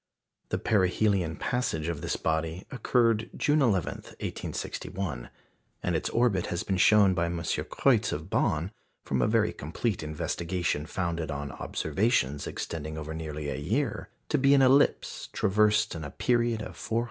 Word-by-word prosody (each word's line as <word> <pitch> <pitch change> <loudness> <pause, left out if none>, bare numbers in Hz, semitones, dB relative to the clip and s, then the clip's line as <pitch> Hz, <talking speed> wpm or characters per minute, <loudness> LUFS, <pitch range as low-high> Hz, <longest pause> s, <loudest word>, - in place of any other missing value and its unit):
The - - 0
perihelion 95 -3 +2
passage 120 -11 -1
of 85 -4 -3
this - - -1
body 80 +3 -1
occurred 115 -3 +2
June 150 +1 +3
11, 100 - +1 0.2
1861; 90 -10 -4 0.5
and 90 - 0
its 80 - -1
orbit 115 -7 +2
has 85 - -2
been 95 - -1
shown 100 0 +6
by 85 -1 +1
M. 85 0 -3
Kreutz 85 0 +1
of - - -4
Bonn, 80 +5 0 0.3
from 65 -2 0
a - - +3
very - - +2
complete 90 +8 -2
investigation 80 +1 -2
founded 85 -2 -2
on 70 -1 -4
observations 75 - 0
extending 80 -1 -5
over 80 0 -5
nearly 75 -2 -5
a - - -3
year, 110 - -1 0.2
to - - +2
be 140 +1 +5
an 135 - +5
ellipse 135 +2 +3
traversed 105 +2 +3
in 80 -2 -6
a 70 - -5
period 120 - +1
of - - -8
409 110 - -4
years. - - +4
90 Hz, 160 wpm, -28 LUFS, 80-110 Hz, 0.5 s, shown